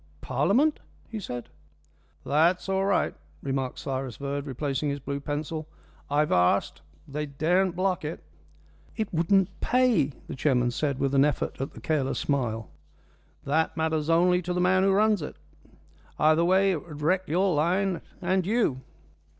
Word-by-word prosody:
"Parliament?" 240 - +2 0.3
he 225 - -5
said. 125 - -6 0.8
"That's 170 +6 +2
all 195 0 +1
right," 200 -1 +1 0.3
remarked 135 -2 -2
Cyrus 130 -3 -4
Verd, 140 +1 -4
replacing 140 +2 -2
his 140 0 -2
blue 140 +1 -4
pencil. 150 +2 -4 0.4
"I've 150 +1 +1
asked. 90 0 +2 0.3
They 150 +2 -4
daren't 175 +6 +1
block 185 -1 0
it." 155 +2 -5 0.7
"It 220 -4 -3
wouldn't 185 +3 +3
pay," 250 - +3 0.2
the - - -6
chairman 125 -3 +2
said, 140 +1 -1
with 135 0 0
an 135 0 +5
effort 145 -2 -1
at 135 - -4
the - - -11
careless 145 -4 0
smile. 115 - -1 0.7
"That 160 +4 0
matters 160 -1 0
only 180 +2 +4
to 180 0 -3
the 180 - -1
man 185 +1 +3
who 195 +1 +3
runs 210 -1 +3
it. 150 - -6 0.8
Either 155 +2 +4
way 190 +2 +4
it 165 -5 -2
would 150 -3 -9
wreck 185 +4 +1
your 185 +3 +2
line 180 +4 +1 0.2
and 185 +1 +2
you. 200 - +1
160 Hz, 155 wpm, -27 LUFS, 140-185 Hz, 0.8 s, an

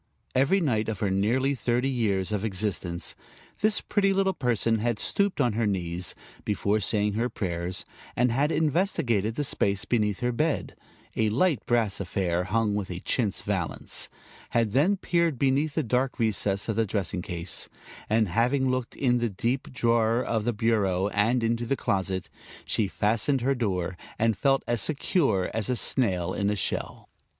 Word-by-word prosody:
Every 140 +10 +3
night 115 - 0
of 105 -4 -3
her 100 -2 0
nearly 120 +8 +2
thirty 125 0 0
years 105 -7 0
of 105 -1 -1
existence 95 -4 -2 0.5
this 215 0 +3
pretty 195 -2 +1
little 195 0 +2
person 115 - +1
had 120 0 0
stooped 200 - 0
on 125 -5 +2
her 110 0 +1
knees, 90 -2 -1 0.3
before 105 0 0
saying 105 0 0
her 115 +4 0
prayers, 90 -3 -3 0.3
and 125 0 +2
had 140 +6 +1
investigated 150 - +1
the 145 - -1
space 100 -7 0
beneath 105 -2 0
her 125 0 +1
bed, 150 +5 -1 0.4
a 110 -1 +2
light 135 - +2
brass 115 -4 +1
affair, 90 -2 -1
hung 105 +1 +1
with 100 -2 -2
a 90 0 -5
chintz 110 -7 -1
valance; - - -2 0.4
had 115 -3 +1
then 155 - +3
peered 170 -5 +1
beneath 140 +4 +1
the 160 - +1
dark 125 +2 0
recess 100 -3 +1
of 110 -2 -1
the 115 - +3
dressing 95 -2 -2
case, 85 -1 -2 0.4
and 110 0 +3
having 125 +8 +2
looked 130 -2 -3
in 125 -3 +2
the 120 -1 0
deep 120 +7 -2
drawer 115 -1 +2
of 110 -2 -1
the 120 - +2
bureau 105 -4 +1
and 115 +4 +1
into 115 +1 0
the 135 - 0
closet, 95 -1 -1 0.4
she 105 - +1
fastened 115 +7 +1
her 135 +3 +2
door 95 -7 -1 0.2
and 115 -1 +2
felt 135 +4 +2
as 120 -2 0
secure 140 - +1
as 110 +1 -2
a 125 - +2
snail 95 -9 0
in 100 0 0
a 105 - +1
shell. 100 - -3
115 Hz, 170 wpm, -27 LUFS, 100-130 Hz, 0.5 s, Every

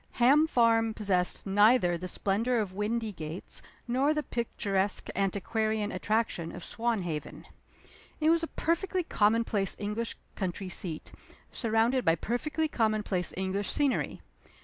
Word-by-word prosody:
Ham 280 +6 +5
Farm 225 -4 +3
possessed 185 -4 0
neither 205 -2 +4
the 180 +2 -5
splendor 215 +7 0
of 200 -4 -2
Windygates 210 -6 -3 0.3
nor 270 +5 +2
the 300 - 0
picturesque 205 -6 -1
antiquarian 210 +2 0
attraction 185 -4 -1
of - - -8
Swanhaven. 195 -10 -2 0.7
It 310 +1 +4
was 335 0 +3
a 330 - -2
perfectly 360 +4 -1
commonplace 215 - +1
English 210 +3 -3 0.2
country 190 0 -3
seat, 175 -4 -3 0.4
surrounded 230 +3 +1
by 165 - +4
perfectly 300 - -1
commonplace 215 -8 0
English 190 +1 -1
scenery. 285 -3 0
215 Hz, 120 wpm, -29 LUFS, 195-240 Hz, 0.7 s, Ham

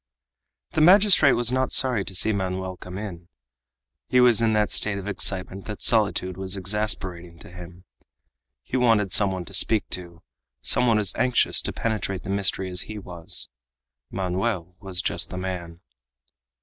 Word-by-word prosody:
The - - 0
magistrate 180 -5 +6
was 120 0 +1
not 130 0 0
sorry 125 -6 +3
to 95 - -6
see 110 +4 +2
Manoel 95 -1 -3
come 90 +1 -9
in. 90 -5 -7 0.8
He 125 - +3
was 120 -2 +5
in 115 -1 +2
that 105 -1 +1
state 105 -2 0
of 100 0 -7
excitement 95 -1 -3
that 105 -2 -6
solitude 100 -5 +1
was 95 0 -3
exasperating 95 -4 -3
to 85 - -13
him. 90 0 -12 0.8
He 130 - -3
wanted 115 -6 +2
some 100 0 +3
one 95 -2 -5
to 100 - -13
speak 105 +2 +1
to, 85 -1 -6 0.4
some 125 - +3
one 115 -2 +3
as 105 -3 +1
anxious 125 0 +2
to - - -2
penetrate 100 -4 -3
the 95 - -5
mystery 95 -1 0
as 90 - 0
he 110 - -6
was. 90 -4 -2 0.6
Manoel 95 -1 -3
was 95 -3 -4
just - - -2
the 90 - -7
man. 90 -2 -6
95 Hz, 165 wpm, -24 LUFS, 90-110 Hz, 0.8 s, magistrate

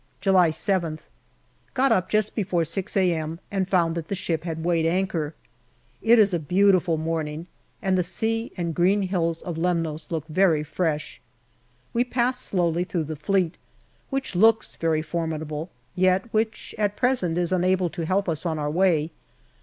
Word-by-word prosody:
July 185 -4 +4
7th. 165 -2 -1 0.7
Got 270 +1 +3
up 185 -1 +2
just 215 0 +1
before 180 -5 0
6 185 +5 -3
a.m. 165 -3 0
and 190 -2 0
found 175 -4 +2
that 165 -1 -4
the 200 - -2
ship 170 -3 -2
had 160 -1 -4
weighed 165 -2 +2
anchor. 165 -3 -1 0.7
It 230 +1 +5
is 205 -3 +5
a 170 - +1
beautiful 180 0 +3
morning, 160 0 -3 0.4
and 190 -1 +2
the 185 - +3
sea 225 +6 -1
and 170 -2 -2
green 190 +5 +3
hills 170 -3 -1
of 170 -2 -4
Lemnos 165 -3 -1
look 160 -3 -3
very 165 -1 +2
fresh. 155 -1 -2 0.7
We 235 - +3
pass 250 0 0
slowly 175 -6 0
through 180 -2 -2
the 155 +1 -5
Fleet, 180 +2 0 0.5
which 270 -4 -3
looks 220 +4 +3
very 160 -1 0
formidable, 155 0 -3 0.2
yet 185 +4 +1
which 220 0 -1
at 205 -1 0
present 245 -10 +1
is 175 0 0
unable 185 -1 +2
to 165 - -4
help 195 +2 +1
us 160 -2 -2
on 165 -3 -1
our 150 -1 -2
way. 170 -2 +2
175 Hz, 165 wpm, -25 LUFS, 160-195 Hz, 0.7 s, It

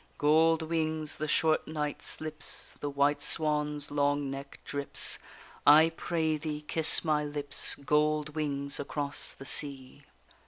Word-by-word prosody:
Gold 160 +2 +4
wings, 155 -1 -2
the 155 - -3
short 155 0 +2
night 150 -2 -3
slips, 155 -1 -4
The 145 - -3
white 140 +1 +1
swan's 150 -1 -1
long 145 -1 0
neck 140 0 -8
drips, 140 -1 -1 0.4
I 155 +3 +7
pray 160 -3 -1
thee 150 0 -5
kiss 160 +2 +2
my 150 -1 +2
lips, 145 -1 +1
Gold 150 +1 +1
wings 140 -2 -3
across 145 0 -3
the 135 - -12
sea! 140 -1 0
150 Hz, 130 wpm, -30 LUFS, 145-155 Hz, 0.4 s, I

